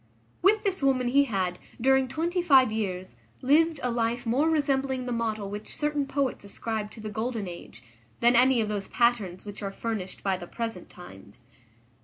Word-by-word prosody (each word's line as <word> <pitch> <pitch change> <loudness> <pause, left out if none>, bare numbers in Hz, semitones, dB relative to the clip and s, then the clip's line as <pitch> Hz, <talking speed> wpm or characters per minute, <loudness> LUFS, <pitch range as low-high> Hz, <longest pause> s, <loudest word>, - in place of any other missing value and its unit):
With 415 +3 +4
this 385 -5 -1
woman 260 -3 +2
he 280 +3 +4
had, 185 -7 -2 0.2
during 265 +2 +3
twenty 335 +7 -1
five 270 -9 +5
years, 185 -4 -3 0.3
lived 310 +3 +3
a 250 - 0
life 235 +1 -1
more 265 +8 +2
resembling 275 -4 0
the 250 - -3
model 220 -3 -2
which 210 +1 -6
certain 295 -2 0
poets 275 -5 -1
ascribe 210 +1 -4
to - - -11
the 215 - -6
golden 220 -1 -3
age, 170 -9 -10 0.4
than 240 +1 +4
any 250 0 +5
of 215 - -1
those 205 -2 -3
patterns 220 -7 +1
which 205 +1 -8
are 200 -1 -3
furnished 200 -3 -5
by 195 -2 +1
the 175 -1 -9
present 225 -5 -5
times. 105 - -13
235 Hz, 180 wpm, -27 LUFS, 205-270 Hz, 0.4 s, five